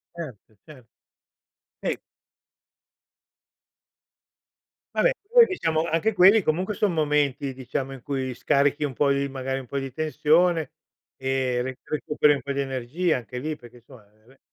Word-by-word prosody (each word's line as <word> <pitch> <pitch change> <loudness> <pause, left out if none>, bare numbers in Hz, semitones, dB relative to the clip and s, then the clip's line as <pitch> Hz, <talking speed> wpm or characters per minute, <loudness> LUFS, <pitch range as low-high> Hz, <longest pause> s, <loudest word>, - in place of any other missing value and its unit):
Certo, 130 -10 -9
cer 140 -6 -14 1.0
eh. - - -1 3.0
Vabbè, - - +4 0.2
poi 480 0 +8
diciamo 165 - 0
anche 190 +8 +1
quelli 195 +3 +7
comunque 180 +5 0
son 200 -2 0
momenti, 145 -3 0
diciamo, 130 +1 -4
in 135 -2 -9
cui 130 -1 -3
scarichi 145 +4 +1
un 140 - -4
po' 140 +2 +2
di 140 0 +1
magari 135 0 -3
un 130 - -9
po' 140 - -5
di 135 -1 -3
tensione 155 +2 +2 0.5
e 130 -2 0
re 130 +1 -4
recuperi 150 0 +1
un 140 - -6
po' 140 - -4
di 140 - -1
energia 135 +6 -1
anche 125 0 -8
lì, 155 +3 -4
perché 120 -2 -15
insomma, 120 -1 -16
vabbè 110 +6 -25
140 Hz, 145 wpm, -25 LUFS, 130-155 Hz, 3.0 s, poi